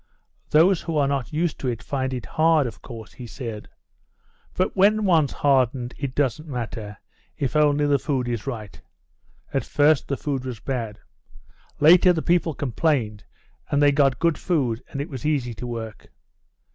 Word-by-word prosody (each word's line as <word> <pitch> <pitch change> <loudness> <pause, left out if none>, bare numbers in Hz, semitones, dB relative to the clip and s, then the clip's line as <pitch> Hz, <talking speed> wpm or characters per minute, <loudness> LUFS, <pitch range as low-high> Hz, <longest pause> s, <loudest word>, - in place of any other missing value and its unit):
"Those 170 +4 +4
who 165 -2 -3
are 140 -2 +3
not 135 -4 -2
used 160 +1 -1
to 130 - -3
it 115 -3 -3
find 130 -2 -2
it 125 -5 -4
hard, 155 - +3
of 105 -7 -7
course," 115 -2 -10
he 125 - -9
said; 115 -4 -7 0.9
"but 185 - 0
when 210 +2 +4
one's 160 -6 +3
hardened 130 -3 +1
it 135 -2 -5
doesn't 145 +2 -1
matter, 115 -5 -5 0.4
if 140 +2 -2
only 150 -1 +3
the 145 -1 +2
food 130 -3 -1
is 120 -2 -3
right. 110 -6 -6 0.7
At - - 0
first 150 0 +2
the 140 - -2
food 140 -3 -3
was 125 -4 -6
bad. 115 -4 -4 0.8
Later 180 +4 +7
the 160 - -2
people 170 -3 +1
complained, 125 -6 -1 0.4
and 145 - +1
they 145 -1 +5
got 140 -2 +2
good 170 -1 +1
food, 130 -10 -1
and 140 - -6
it 145 - -4
was 130 -5 -8
easy 140 -6 0
to 125 +3 -7
work." 115 -3 -7
135 Hz, 170 wpm, -23 LUFS, 120-155 Hz, 0.9 s, Later